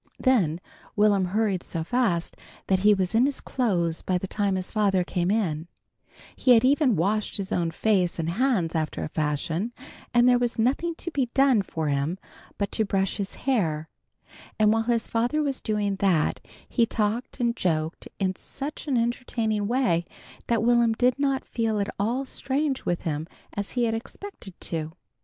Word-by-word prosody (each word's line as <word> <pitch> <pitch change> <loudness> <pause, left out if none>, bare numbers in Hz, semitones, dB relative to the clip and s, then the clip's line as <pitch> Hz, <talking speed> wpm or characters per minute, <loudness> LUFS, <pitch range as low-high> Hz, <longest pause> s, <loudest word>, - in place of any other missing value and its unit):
Then 190 - +2 0.4
Will'm 205 -2 +4
hurried 195 -1 0
so 165 - -4
fast 190 -5 0 0.3
that 190 -1 +2
he 210 +2 +5
was 185 0 -1
in 235 +4 +4
his 285 - -3
clothes 175 -10 0
by 185 - 0
the 180 - -4
time 200 0 0
his 185 -1 -3
father 200 -4 +2
came 175 0 -1
in; 175 -7 0 0.7
he 250 -2 +5
had 230 - +4
even 275 -3 +4
washed 205 +5 0
his 195 -1 -4
own 170 -2 +1
face 185 -1 +1
and 165 0 -1
hands 215 -6 +1
after 155 -2 -2
a - - -4
fashion, 160 +7 -1 0.4
and 240 0 +5
there 245 -1 +5
was 245 0 -1
nothing 275 +9 +1
to 345 - -6
be 270 -5 0
done 270 -5 +5
for 160 -4 -3
him 140 +5 0 0.4
but 200 -1 -2
to 220 - +1
brush 195 -2 0
his 200 -2 -4
hair, 160 - 0 0.7
and 215 0 +4
while 225 - +2
his 235 -1 +1
father 245 +7 +1
was 275 -3 -2
doing 205 -3 -1
that, 185 -6 +2 0.3
he 235 -2 +2
talked 225 +4 -2
and 235 -1 +1
joked 160 -5 -1
in 190 -1 0
such 295 +8 -6
an 270 -4 +1
entertaining 230 -3 -1
way 210 -9 +1 0.4
that 230 -1 +1
Will'm 235 -1 +4
did 250 +3 +2
not 275 -2 0
feel 225 -2 -1
at 200 - -2
all 240 +7 0
strange 270 +1 -2
with 175 - -1
him 155 0 -2 0.3
as 205 0 -4
he 245 - +1
had 225 -1 +1
expected 225 - -8
to - - -3 0.2
do. 160 - -15
210 Hz, 180 wpm, -26 LUFS, 180-245 Hz, 0.7 s, he